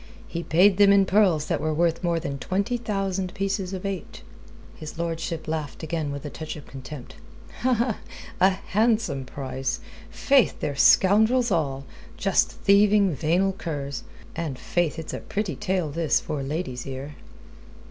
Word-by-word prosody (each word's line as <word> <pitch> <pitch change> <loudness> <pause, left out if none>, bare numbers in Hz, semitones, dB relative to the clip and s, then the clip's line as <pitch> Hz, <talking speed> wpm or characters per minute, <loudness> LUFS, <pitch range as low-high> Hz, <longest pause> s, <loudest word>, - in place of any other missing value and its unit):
He 170 - -4
paid 180 +4 +4
them 200 -1 +7
in 200 -1 +5
pearls 185 -6 +3
that - - -1
were 155 0 0
worth 170 +1 +1
more 170 -1 +1
than 140 -3 -4
twenty 200 - -1
thousand 195 -5 -2
pieces 195 -1 -2
of 190 0 -5
eight." 195 -2 -5 0.5
His 155 +1 -9
lordship 165 -1 -3
laughed 155 -2 -4
again 160 -2 -2
with 140 0 -6
a 145 - -5
touch 155 -1 -6
of 150 - -10
contempt. 135 0 -9 0.5
"A 235 -5 0
handsome 195 - 0
price! 130 0 -3 0.3
Faith, 275 -4 +2
they're 145 -2 -2
scoundrels 220 - +5
all 140 -6 0 0.3
just - - +2
thieving, 200 -1 +4
venal 175 +7 +1
curs. 145 -7 -5 0.3
And 160 -6 -3
faith, 175 +2 -1
it's 160 - -6
a - - -3
pretty 200 -6 -3
tale 185 -3 -1
this 165 +1 +1
for 150 - -4
a - - -3
lady's 135 -4 -4
ear." 135 +2 -6
170 Hz, 155 wpm, -25 LUFS, 150-195 Hz, 0.5 s, them